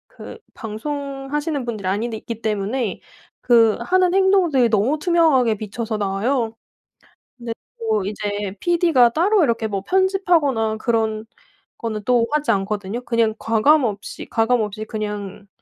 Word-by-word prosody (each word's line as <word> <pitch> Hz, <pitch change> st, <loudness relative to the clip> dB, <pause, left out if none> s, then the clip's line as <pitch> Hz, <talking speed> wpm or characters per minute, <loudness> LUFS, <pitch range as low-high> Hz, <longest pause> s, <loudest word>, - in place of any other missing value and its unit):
그 465 Hz, -, -10 dB, 0.2 s
방송하시는 280 Hz, +4 st, -4 dB
분들이 215 Hz, -5 st, -4 dB
아닌데 220 Hz, +4 st, -1 dB
있기 230 Hz, 0 st, -8 dB
때문에 215 Hz, +1 st, -2 dB, 0.4 s
그 230 Hz, -3 st, +4 dB
하는 365 Hz, +6 st, +2 dB
행동들이 375 Hz, -10 st, +3 dB
너무 230 Hz, +8 st, +1 dB
투명하게 305 Hz, -9 st, +3 dB
비춰서 220 Hz, +1 st, -4 dB
나와요. 220 Hz, +4 st, -1 dB, 0.8 s
근데 235 Hz, -1 st, -5 dB, 0.2 s
뭐 220 Hz, -3 st, 0 dB
이제 205 Hz, -1 st, -4 dB
피디가 335 Hz, -8 st, +4 dB
따로 365 Hz, -, +2 dB
이렇게 230 Hz, -5 st, 0 dB
뭐 200 Hz, -2 st, -3 dB
편집하거나 340 Hz, -, +1 dB
그런 220 Hz, -1 st, -1 dB, 0.5 s
거는 220 Hz, -2 st, -4 dB
또 240 Hz, -1 st, +3 dB
하지 300 Hz, -1 st, +1 dB
않거든요. 205 Hz, +3 st, -2 dB
그냥 230 Hz, -2 st, +1 dB
과감 260 Hz, +7 st, +3 dB
없이 205 Hz, -4 st, -4 dB
가감 225 Hz, +1 st, +2 dB
없이 215 Hz, +1 st, -4 dB
그냥 210 Hz, -2 st, -5 dB
230 Hz, 300 characters per minute, -21 LUFS, 215-285 Hz, 0.8 s, 그